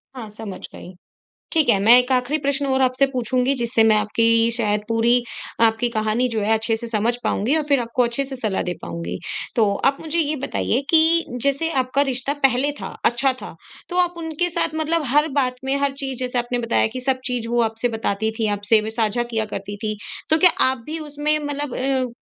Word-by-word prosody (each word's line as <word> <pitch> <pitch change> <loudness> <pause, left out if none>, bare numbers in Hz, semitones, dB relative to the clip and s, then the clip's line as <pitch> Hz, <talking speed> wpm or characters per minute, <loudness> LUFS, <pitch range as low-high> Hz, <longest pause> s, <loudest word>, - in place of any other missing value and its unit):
हाँ, 235 -4 -7
समझ 210 -2 -8
गई। 185 - -11 0.6
ठीक 315 -5 +2
है 205 - +4
मैं 230 +4 +7
एक 250 +1 0
आखिरी 255 +4 +1
प्रश्न 280 0 0
और 265 0 +1
आपसे 260 +2 +3
पूछूँगी 250 +2 0
जिससे 235 -1 +2
मैं 220 -1 +4
आपकी 230 +2 +3
शायद 210 -3 0
पूरी 230 +1 +3 0.5
आपकी 225 +2 -1
कहानी 220 +2 0
जो 220 - 0
है 210 +2 +1
अच्छे 225 +1 0
से 235 +1 -5
समझ 230 +1 0
पाऊँगी 255 +10 +1
और 310 - +1
फिर 275 -3 +4
आपको 235 +1 0
अच्छे 240 +3 0
से 265 -1 -7
सलाह 215 -5 -2
दे 175 - -2
पाऊँगी। 85 +1 -5 0.4
तो 225 - +4 0.2
आप 275 0 +3
मुझे 320 +1 -3
ये 305 -1 0
बताइए 255 -2 -1
कि 330 +1 +4 0.2
जैसे 280 +4 +1
आपका 255 +2 0
रिश्ता 260 +3 -1
पहले 265 +2 0
था, - - -7
अच्छा 260 +3 +3
था - - -8 0.3
तो 355 - -4
आप 355 0 +1
उनके 325 +1 -2
साथ 330 -2 -2
मतलब 315 +1 0
हर 300 +2 +4
बात 250 -1 -1
में 270 +1 0
हर 280 - +1
चीज़ 265 -2 -3
जैसे 250 -1 -1
आपने 245 0 -2
बताया 230 - +2
कि 255 - -3
सब 260 0 -1
चीज़ 245 -2 -1
वो 240 0 +1
आपसे 225 +2 -1
बताती 220 0 -1
थी 225 - +1
आपसे 210 +2 +3
वे 215 - -4
साझा 225 +2 +1
किया 230 -2 -2
करती 205 +1 -6
थीं, 215 -1 -1 0.3
तो 315 - +5
क्या 360 +2 +7 0.2
आप 260 - -3
भी 315 +2 -4
उसमें 295 +1 +1
मतलब 290 -2 -4
अ, 260 -2 0
250 Hz, 215 wpm, -21 LUFS, 225-280 Hz, 0.6 s, मैं